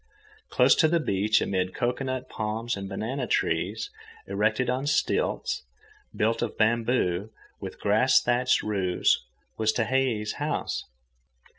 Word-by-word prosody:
Close - - +5
to 160 - +4
the 170 +2 +2
beach, 105 -6 +1
amid 95 -1 -1
cocoanut 130 +1 -2
palms 110 +1 -3
and 100 -1 -6
banana 125 +5 -3
trees, - - -1 0.3
erected 110 +5 0
on 130 +3 -1
stilts, 150 - 0 0.5
built 115 +2 +1
of 120 -2 -3
bamboo, 110 -4 +1 0.3
with - - -7
a - - -27
grass - - +4
thatched 125 +1 +2
roof, 95 -4 -2 0.5
was 110 -1 +2
Tehei's 120 -2 0
house. - - -2
110 Hz, 125 wpm, -27 LUFS, 105-125 Hz, 0.5 s, Close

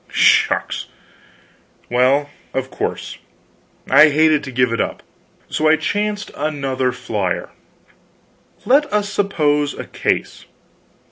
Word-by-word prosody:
Shucks! - - +2 1.0
Well, 135 +4 +2 0.2
of 130 0 -2
course, - - -4 0.7
I 155 +1 +7
hated 155 0 +3
to 135 - -7
give 125 -1 +1
it 115 - 0
up. - - -4 0.4
So 155 0 0
I 160 - +6
chanced 205 +6 -2
another 135 -4 -1
flyer: 105 -7 -3 1.1
"Let 285 +4 +3
us 210 -1 0
suppose 150 -8 +1
a - - -6
case. - - -2
145 Hz, 110 wpm, -19 LUFS, 130-160 Hz, 1.1 s, I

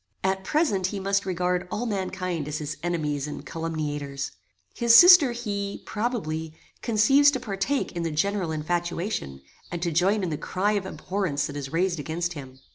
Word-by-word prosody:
At 190 0 0
present 210 - +1
he 200 +1 -4
must 195 +1 0
regard 180 0 -1
all 230 +6 -3
mankind 185 -6 -3
as 150 0 -3
his 150 0 -4
enemies 150 -5 -2
and 150 - -7
calumniators. 150 -4 -4 0.4
His 235 -1 +4
sister 350 -4 +9
he, 200 -4 -4
probably, 160 -9 -3 0.3
conceives 255 +6 +5
to 290 - -1
partake 205 +7 -2
in 170 - -4
the 165 - -1
general 180 +3 0
infatuation, 170 - -3 0.3
and 175 - -3
to 170 - 0
join 190 +6 +2
in 175 - -2
the 150 - -3
cry 195 +3 0
of 200 -2 -1
abhorrence 170 -3 -2
that 145 - -6
is 140 -2 -5
raised 175 0 0
against 170 +4 -3
him. 130 -4 -10
180 Hz, 170 wpm, -26 LUFS, 155-205 Hz, 0.4 s, sister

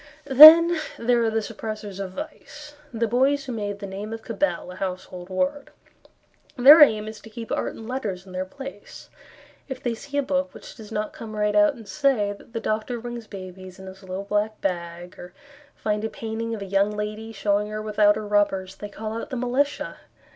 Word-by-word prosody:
Then 315 +5 +10 0.2
there 235 0 +2
are 225 - +2
the 220 0 -1
Suppressors 215 -2 -7
of 190 -2 -5
Vice; 300 +1 -9 0.2
The 230 -1 -1
Boys 270 +5 +2
Who 260 - -5
Made 205 -3 -4
the 200 - -7
Name 200 +3 -6
of 225 0 -7
Cabell 195 -5 -2
a - - -10
Household 185 -1 -6
Word. 275 +9 -2 0.9
Their 285 +6 +9
aim 215 -7 +5
is 220 -1 -8
to 220 - -13
keep 230 0 -8
art - - -2
and 220 - -10
letters 205 -8 -4
in 190 - -13
their 185 0 -3
place; 270 +2 -11 0.6
If 265 -2 -7
they 240 - 0
see 280 +5 -7
a 285 - +2
book 275 0 -2
Which - - -11
does 220 -2 -12
not 210 -1 -3
come 220 -1 -8
right 210 0 0
out 310 -2 +4
and 225 -4 -13
say 265 -9 +1
That 205 - -17
the 230 - -2
doctor 220 +3 -2
brings 240 -1 -7
babies 185 -1 -10
in 190 - -11
his 190 +1 -11
little 190 0 -6
black 210 +1 -1
bag, 175 -1 -4
Or 180 0 -10 0.4
find 210 0 -2
a 220 - -1
painting 225 +1 -4
of 205 - -6
a - - -6
young 195 +1 +2
lady 210 +1 -5
Showing 205 0 0
her 215 0 -5
without 210 -1 +3
her 215 0 -5
rubbers, 195 -2 0
They 205 - -7
call 215 +1 -6
out - - -8
the 260 - -4
militia. 255 +4 -1
215 Hz, 205 wpm, -24 LUFS, 200-245 Hz, 0.9 s, Then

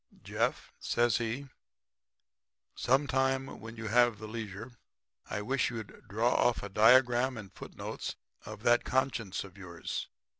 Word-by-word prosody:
"'Jeff,' - - -1
says 120 -1 +2
he, 120 +4 -3 1.3
'some 135 +3 +2
time 135 0 0
when 115 +1 -8
you 115 -1 -7
have 120 0 +4
the 110 +1 -8
leisure 110 +1 -6 0.6
I 105 - -3
wish 130 +4 +1
you'd 115 -3 -8
draw 115 +4 +2
off 120 - +2
a 100 - -5
diagram 120 +4 +5
and 105 -3 -9
foot - - -10
notes - - -5 0.3
of 110 0 -9
that 120 0 +4
conscience 120 -7 0
of 100 0 -13
yours. 85 -3 -5
115 Hz, 145 wpm, -31 LUFS, 105-125 Hz, 1.3 s, diagram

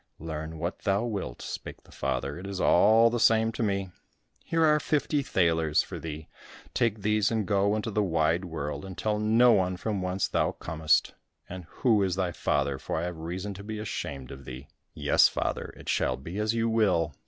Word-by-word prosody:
"Learn 80 0 -6
what 85 +3 -4
thou 100 +3 0
wilt," 100 - -4
spake - - -7
the - - -20
father, 70 +5 -3
"it 95 - -7
is 100 -1 -5
all 110 +7 +5
the 120 - -1
same 115 0 +4
to 115 - -5
me. 100 -3 -1 0.5
Here 165 -1 +2
are 150 -1 +4
fifty 150 -1 0
thalers 80 - +2
for - - -7
thee. 80 -1 -7 0.5
Take 110 -5 0
these 105 -1 +2
and 110 -3 -1
go 100 0 +2
into 110 +1 -3
the 105 - +1
wide 85 -1 +1
world, 80 -2 -5
and 95 -1 -8
tell 105 -1 -1
no 115 +3 +5
one 90 -2 +1
from 100 0 -2
whence 90 +1 -1
thou - - 0
comest, 80 -1 +1 0.3
and 90 -1 -8
who 110 - +1
is 95 -2 +1
thy 95 -2 -1
father, 70 -4 -1
for - - -3
I 80 - -1
have 90 -1 -4
reason 90 +5 -4
to 100 +1 -10
be 110 +1 -5
ashamed 75 - -5
of 70 -1 -10
thee." 65 +2 -9 0.3
"Yes, - - +5
father, - - -3
it - - -13
shall - - +1
be 85 +9 -7
as 110 +2 0
you 115 0 +1
will. 95 -9 +2
95 Hz, 200 wpm, -28 LUFS, 80-110 Hz, 0.5 s, all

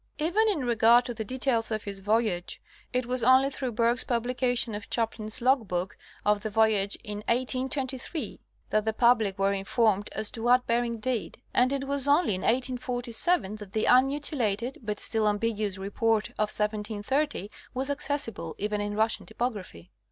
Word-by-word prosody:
Even 370 +9 +2
in 310 -11 -1
regard 235 +1 +5
to 245 - -4
the 220 - -4
details 245 -1 0
of 215 -2 -2
his 200 -1 -5
voyage 210 -3 -1 0.3
it 250 0 0
was 250 +1 -2
only 260 +3 +5
through 265 -2 -4
Bergh's 235 +2 +2
publication 245 -1 0
of 205 +1 -7
Chaplin's 225 -1 -1
logbook 220 -8 +1 0.3
of 210 0 +2
the 215 - -3
voyage 210 -2 +2
in 210 0 -5
1823, 260 - -2 0.3
that 215 0 +2
the 220 0 -1
public 225 -4 +3
were 195 0 +2
informed 205 +1 +1
as 215 - 0
to 225 - -7
what 245 +2 +3
Bering 235 0 0
did, 235 -1 -3 0.2
and 250 +1 +3
it 275 -1 -1
was 280 0 +1
only 290 - +4
in 185 - -1
1847 245 - +1
that 205 -2 -11
the 215 - 0
unmutilated, 255 -3 +1
but 210 -2 -4
still 220 -2 +2
ambiguous 210 -1 -1
Report 210 +3 0
of 210 0 -2
1730 210 +3 -1 0.2
was 265 +2 -1
accessible 270 - -3
even 210 0 -2
in 205 0 -3
Russian 220 +1 0
typography. 190 - -5
230 Hz, 160 wpm, -27 LUFS, 210-255 Hz, 0.3 s, regard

